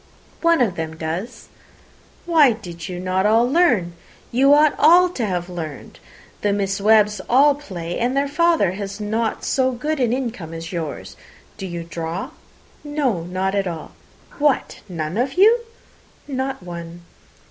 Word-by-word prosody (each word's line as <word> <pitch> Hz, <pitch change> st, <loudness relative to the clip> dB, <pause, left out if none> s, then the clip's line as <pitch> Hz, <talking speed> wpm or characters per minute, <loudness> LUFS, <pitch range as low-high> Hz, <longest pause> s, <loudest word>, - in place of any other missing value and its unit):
"One 335 Hz, -3 st, +3 dB
of 200 Hz, -8 st, +1 dB
them 160 Hz, -1 st, -4 dB
does." 165 Hz, +9 st, -5 dB, 0.8 s
"Why 310 Hz, -7 st, +5 dB
did 180 Hz, -6 st, -10 dB, 0.3 s
not 185 Hz, +1 st, 0 dB
you -, -, +4 dB
all 230 Hz, +2 st, +4 dB
learn? 250 Hz, -, +2 dB, 0.4 s
You 270 Hz, +4 st, +4 dB
ought 295 Hz, 0 st, +6 dB
all 350 Hz, +4 st, +6 dB
to 270 Hz, -9 st, -4 dB
have 180 Hz, -4 st, -2 dB
learned. 165 Hz, -5 st, -7 dB, 0.4 s
The 205 Hz, -, +1 dB
Miss 195 Hz, -1 st, -1 dB
Webbs 210 Hz, -1 st, +4 dB
all 280 Hz, +4 st, +6 dB
play, 180 Hz, -, -6 dB
and 250 Hz, +3 st, 0 dB
their 280 Hz, +1 st, +2 dB
father 330 Hz, -, +2 dB
has 200 Hz, +1 st, -6 dB
not 220 Hz, +2 st, -2 dB
so 260 Hz, -1 st, +1 dB
good 300 Hz, +5 st, -3 dB
an 245 Hz, -3 st, +1 dB
income 235 Hz, -11 st, -4 dB
as 165 Hz, +2 st, -7 dB
yours. 160 Hz, -4 st, -5 dB, 0.4 s
Do 195 Hz, -, -6 dB
you 170 Hz, -1 st, -5 dB
draw?" 165 Hz, +1 st, -5 dB, 0.5 s
"No, 290 Hz, -, -1 dB
not 185 Hz, +2 st, -2 dB
at 200 Hz, -1 st, 0 dB
all." 165 Hz, -3 st, -6 dB, 0.5 s
"What, 290 Hz, -2 st, +1 dB
none 165 Hz, +1 st, -4 dB
of 260 Hz, +3 st, -1 dB
you?" 435 Hz, +6 st, +6 dB, 0.7 s
"Not 265 Hz, -5 st, -3 dB
one." 170 Hz, -1 st, -8 dB
210 Hz, 155 wpm, -21 LUFS, 175-275 Hz, 0.8 s, ought